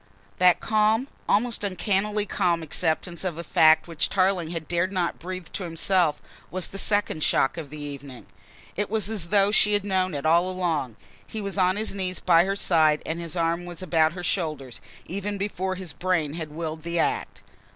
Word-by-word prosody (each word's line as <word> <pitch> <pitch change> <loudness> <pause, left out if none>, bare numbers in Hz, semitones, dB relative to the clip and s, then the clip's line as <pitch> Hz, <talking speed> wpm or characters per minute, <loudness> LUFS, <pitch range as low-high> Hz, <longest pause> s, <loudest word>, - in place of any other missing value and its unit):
That 180 -1 +5
calm, 220 +3 +2 0.2
almost 230 +1 +1
uncannily 205 +2 0
calm 170 -3 0
acceptance 165 +2 -1
of 175 -4 -3
a 170 - -5
fact 160 0 +4
which 165 -3 -1
Tarling 185 -4 +1
had 165 -2 -4
not - - -25
dared 175 +1 0
to 175 -2 0
breathe 185 0 -6
to 195 - -3
himself, 170 -1 +1 0.3
was 185 0 -1
the 195 - -6
second 205 -8 0
shock 135 - +2
of 160 -4 -7
the 150 +1 -8
evening. 140 -3 -8 0.5
It 205 0 -2
was 215 -1 +1
as 185 -6 -1
though 200 0 +4
she 210 0 +4
had 205 -1 0
known 185 -3 0
it 140 - -4
all 170 +3 +4
along. 165 -10 -2 0.3
He 220 - -5
was 200 -1 -3
on 185 0 +3
his 215 0 -2
knees 185 -2 -3
by 170 -1 +4
her 195 +1 -1
side 155 -6 +3
and 165 +1 -3
his 170 -1 -6
arm 170 +1 0
was 175 +1 -8
about 160 -2 +2
her 180 0 -7
shoulders, 155 -8 -3 0.2
even 200 +2 -4
before 190 -1 -2
his 180 -5 -7
brain 175 -5 -1
had 160 -2 -5
willed 160 0 -5
the 170 +1 -3
act. 165 - -1
180 Hz, 195 wpm, -25 LUFS, 160-195 Hz, 0.5 s, That